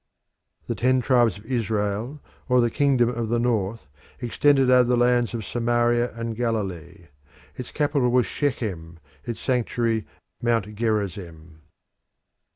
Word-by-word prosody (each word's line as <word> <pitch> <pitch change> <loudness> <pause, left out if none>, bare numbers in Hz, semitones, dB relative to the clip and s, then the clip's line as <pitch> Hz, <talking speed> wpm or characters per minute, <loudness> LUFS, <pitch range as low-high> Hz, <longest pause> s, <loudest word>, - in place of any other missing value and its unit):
The - - -2
ten 130 +1 +2
tribes 120 -5 +2
of 100 - -15
Israel, 110 +2 -2 0.3
or 125 0 +4
the 120 -1 +2
Kingdom 130 -4 +2
of 120 -2 -3
the 120 - +1
North, 115 -4 -1 0.3
extended 135 +2 +3
over 125 -1 +5
the 125 - +3
lands 120 -1 +2
of 110 -3 -5
Samaria 120 +1 +1
and 115 -1 -4
Galilee. 95 -7 -4 0.5
Its 125 - -7
capital 145 -4 +1
was 125 -1 +3
Shechem, 95 - -3 0.3
its 120 -2 -5
sanctuary 115 -3 -1 0.3
Mount 115 -3 0
Gerizim. 95 -8 -3
120 Hz, 130 wpm, -24 LUFS, 105-125 Hz, 0.5 s, over